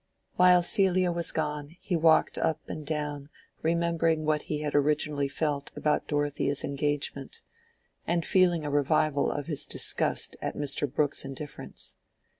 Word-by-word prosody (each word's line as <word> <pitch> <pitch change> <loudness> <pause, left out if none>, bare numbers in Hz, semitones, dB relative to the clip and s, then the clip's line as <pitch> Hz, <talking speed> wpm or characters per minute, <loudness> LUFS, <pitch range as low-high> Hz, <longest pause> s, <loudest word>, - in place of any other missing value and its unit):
While 180 -1 +6
Celia 185 -1 +3
was 170 0 +1
gone 150 +1 -3
he 180 - -2
walked 160 -1 +3
up 160 - 0
and 155 - -6
down 145 -1 -4 0.3
remembering 165 -1 +1
what 155 -1 +1
he 150 -1 -1
had 150 -1 -3
originally 145 0 +1
felt 145 0 -2
about 150 -1 0
Dorothea's 145 -1 -1
engagement, 140 -1 -2 0.6
and 170 0 0
feeling 175 -4 +3
a 145 - -2
revival 145 0 +2
of 145 - -4
his 150 -2 -1
disgust - - 0
at - - -3
Mr. 145 -1 +1
Brooke's 145 0 0
indifference. 135 +2 -8
150 Hz, 140 wpm, -28 LUFS, 145-165 Hz, 0.6 s, While